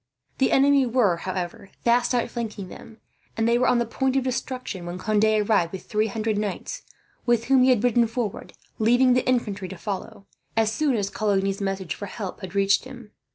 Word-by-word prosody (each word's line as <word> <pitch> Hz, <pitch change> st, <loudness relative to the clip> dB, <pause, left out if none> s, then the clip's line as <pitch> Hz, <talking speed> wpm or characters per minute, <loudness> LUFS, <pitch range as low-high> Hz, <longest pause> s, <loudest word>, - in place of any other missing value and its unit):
The 265 Hz, -, +3 dB
enemy 275 Hz, -1 st, +4 dB
were, 225 Hz, -8 st, +2 dB
however, 185 Hz, +1 st, -5 dB
fast 240 Hz, +1 st, +3 dB
outflanking 230 Hz, -5 st, -3 dB
them; 225 Hz, +4 st, -12 dB, 0.4 s
and 225 Hz, 0 st, +1 dB
they 235 Hz, +1 st, +3 dB
were 250 Hz, -, +3 dB
on 245 Hz, -, +4 dB
the 235 Hz, -, +1 dB
point 265 Hz, +3 st, -1 dB
of 270 Hz, -, +2 dB
destruction 250 Hz, -7 st, -4 dB
when 175 Hz, +1 st, -5 dB
Conde 215 Hz, +2 st, +1 dB
arrived, 210 Hz, -5 st, +2 dB
with 185 Hz, -1 st, -7 dB
three 215 Hz, +1 st, 0 dB
hundred 215 Hz, 0 st, -1 dB
knights 210 Hz, -, -4 dB, 0.5 s
with 240 Hz, -1 st, +3 dB
whom 265 Hz, 0 st, +4 dB
he 255 Hz, -, +5 dB
had 245 Hz, -4 st, +3 dB
ridden 240 Hz, -1 st, +3 dB
forward, 225 Hz, -3 st, -4 dB, 0.3 s
leaving 245 Hz, +3 st, +4 dB
the 250 Hz, -, +1 dB
infantry 210 Hz, -6 st, 0 dB
to 190 Hz, -, -8 dB
follow, 200 Hz, +1 st, -6 dB, 0.3 s
as 220 Hz, -1 st, +3 dB
soon 275 Hz, +3 st, +1 dB
as 200 Hz, -2 st, -1 dB
Coligny's 195 Hz, -1 st, 0 dB
message 195 Hz, -3 st, -2 dB
for 200 Hz, -, -7 dB
help 195 Hz, -1 st, -6 dB
had 190 Hz, 0 st, -8 dB
reached 200 Hz, +2 st, +3 dB
him. 245 Hz, -5 st, -11 dB
220 Hz, 195 wpm, -24 LUFS, 195-245 Hz, 0.5 s, he